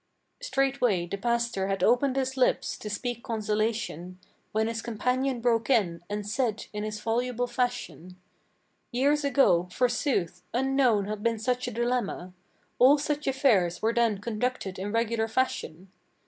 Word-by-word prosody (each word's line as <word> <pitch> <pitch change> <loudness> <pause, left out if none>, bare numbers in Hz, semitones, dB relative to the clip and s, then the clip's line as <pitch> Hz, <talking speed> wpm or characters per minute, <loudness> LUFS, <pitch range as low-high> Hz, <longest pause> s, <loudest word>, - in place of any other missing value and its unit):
Straightway 270 - +1
the 185 +3 -4
pastor 235 -3 0
had 195 0 -1
opened 255 +3 +3
his 265 -1 -1
lips 255 -1 +1
to 210 - -7
speak 235 +3 -4
consolation, 215 -5 -2 0.3
When 220 +1 +1
his 225 -1 -3
companion 250 +3 -1
broke 230 0 +1
in, 185 -10 +2
and 205 0 -3
said 220 -1 -1
in 210 0 -3
his 215 0 -4
voluble 245 +2 -1
fashion: 245 -8 -3 0.7
"Years 285 +4 +2
ago, 270 -11 +3
forsooth, 235 - 0
unknown 255 -5 +2
had 210 0 -4
been 230 +1 +1
such 250 +3 -1
a - - -3
dilemma. 235 -6 -2 0.5
All 270 +4 +7
such 295 0 -2
affairs 220 -11 +2
were 225 +1 +2
then 230 -3 +2
conducted 210 -2 -3
in 200 +2 -3
regular 230 0 0
fashion. 195 -7 -2
230 Hz, 145 wpm, -27 LUFS, 205-250 Hz, 0.7 s, All